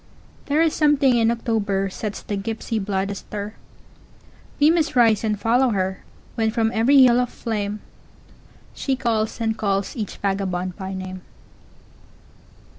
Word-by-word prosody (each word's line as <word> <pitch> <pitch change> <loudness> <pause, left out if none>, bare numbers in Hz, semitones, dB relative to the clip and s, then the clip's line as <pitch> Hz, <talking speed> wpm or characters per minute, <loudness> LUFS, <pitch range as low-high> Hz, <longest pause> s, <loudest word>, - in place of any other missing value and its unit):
There 300 +3 +3
is 325 - +2
something 290 -4 +3
in 230 -1 +3
October 215 -4 0
sets 210 +1 -5
the 205 - -3
gypsy 220 +1 -3
blood 195 0 -1
astir; 205 +1 -6 1.1
We 295 +2 +6
must 320 -3 +1
rise 225 -4 +4
and 210 -2 -1
follow 245 +4 +3
her, 190 -3 -2 0.3
When 225 -1 0
from 225 0 0
every 260 +5 +5
hill 245 -1 +5
of 250 -1 0
flameShe 215 +4 -6
calls 225 -4 -1
and 225 -1 0
calls 200 0 -1
each 215 -5 -5
vagabond 185 -2 -2
by 190 -1 -6
name. 185 0 -6
220 Hz, 135 wpm, -22 LUFS, 200-240 Hz, 1.1 s, We